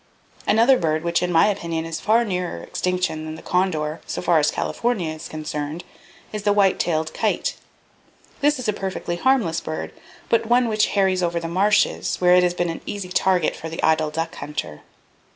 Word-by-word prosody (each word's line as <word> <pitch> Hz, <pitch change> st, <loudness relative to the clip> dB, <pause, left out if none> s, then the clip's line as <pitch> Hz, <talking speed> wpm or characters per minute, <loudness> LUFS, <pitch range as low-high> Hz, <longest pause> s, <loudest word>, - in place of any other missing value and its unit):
"Another 235 Hz, +5 st, +5 dB
bird 160 Hz, -1 st, 0 dB
which 170 Hz, 0 st, +1 dB
in 180 Hz, 0 st, -1 dB
my 165 Hz, -, +5 dB
opinion 170 Hz, -6 st, -1 dB
is 165 Hz, -1 st, -4 dB
far 230 Hz, +5 st, +3 dB
nearer 180 Hz, -, -3 dB
extinction 180 Hz, -4 st, -2 dB
than 155 Hz, 0 st, -6 dB
the 160 Hz, -, -12 dB
condor, 165 Hz, -4 st, 0 dB
so -, -, -3 dB
far 175 Hz, -2 st, +3 dB
as 150 Hz, -, +3 dB
California 205 Hz, -10 st, -1 dB
is 155 Hz, -, -8 dB
concerned, 155 Hz, +1 st, -5 dB, 0.5 s
is 210 Hz, -, -3 dB
the 205 Hz, 0 st, +2 dB
white 200 Hz, -2 st, +3 dB
tailed 160 Hz, -2 st, 0 dB
kite. -, -, -1 dB, 0.8 s
This 295 Hz, +1 st, +3 dB
is 255 Hz, -, -4 dB
a 210 Hz, -, +2 dB
perfectly 190 Hz, -3 st, -4 dB
harmless 230 Hz, -7 st, +2 dB
bird, 155 Hz, -, -5 dB, 0.4 s
but 230 Hz, -1 st, +1 dB
one 240 Hz, +1 st, +3 dB
which 215 Hz, -1 st, +2 dB
harries 190 Hz, -2 st, +3 dB
over 170 Hz, -1 st, 0 dB
the 165 Hz, -, -5 dB
marshes, 195 Hz, +5 st, +2 dB
where 180 Hz, 0 st, +5 dB
it 180 Hz, -, +6 dB
has 175 Hz, 0 st, +1 dB
been 175 Hz, -1 st, 0 dB
an 165 Hz, -, -7 dB
easy 200 Hz, -3 st, -4 dB
target 180 Hz, -2 st, +2 dB
for 165 Hz, -, -7 dB
the 165 Hz, -, -6 dB
idle 160 Hz, -1 st, +3 dB
duck 165 Hz, +2 st, -3 dB
hunter. 150 Hz, -, -6 dB
175 Hz, 190 wpm, -22 LUFS, 160-205 Hz, 0.8 s, it